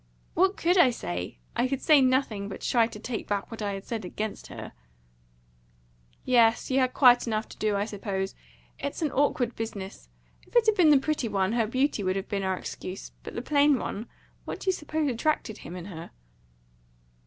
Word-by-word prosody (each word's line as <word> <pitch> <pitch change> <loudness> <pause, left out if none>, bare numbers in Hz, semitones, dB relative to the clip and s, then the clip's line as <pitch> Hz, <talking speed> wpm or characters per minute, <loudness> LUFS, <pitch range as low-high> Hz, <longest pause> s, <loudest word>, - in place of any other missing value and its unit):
"What 380 +4 +3
could 355 +2 +3
I 275 - +7
say? 90 - -4 0.2
I 245 - +2
could 270 0 -2
do 300 -2 +5
nothing, 255 -6 +1
but 195 - -7
try 230 -2 +3
to 225 -2 -10
take 225 +1 -5
back 200 +1 -2
what 225 - -7
I 205 -1 -1
had 195 0 -6
said 225 -3 -4
against 210 +4 -5
her." - - -8 1.5
"Yes, 235 -1 +4
you 265 - +3
had 255 -1 +1
quite 245 -3 +6
enough 220 -1 -1
to - - -12
do, 210 -1 +1
I 200 +1 0
suppose. 195 -2 -3 0.5
It's 280 +3 -3
an 300 - 0
awkward 260 -4 +1
business. 205 -3 -6 0.4
If - - -23
it 475 -2 +6
had 435 - +5
been 355 -6 +5
the 295 - +7
pretty 280 -2 -1
one, 195 -2 0
her 230 -2 +1
beauty 260 0 +1
would 185 0 0
have 195 0 -4
been 200 -1 -1
our 190 -1 -1
excuse. 185 +1 -7
But - - -9
the 235 - -3
plain 285 0 +4
one 225 -1 -4 0.4
what - - -6
do 385 - -1
you - - +6
suppose 310 -3 -2
attracted 245 -3 -1
him 175 - -8
in 175 -2 -7
her?" 170 -4 -8
230 Hz, 200 wpm, -27 LUFS, 200-275 Hz, 1.5 s, I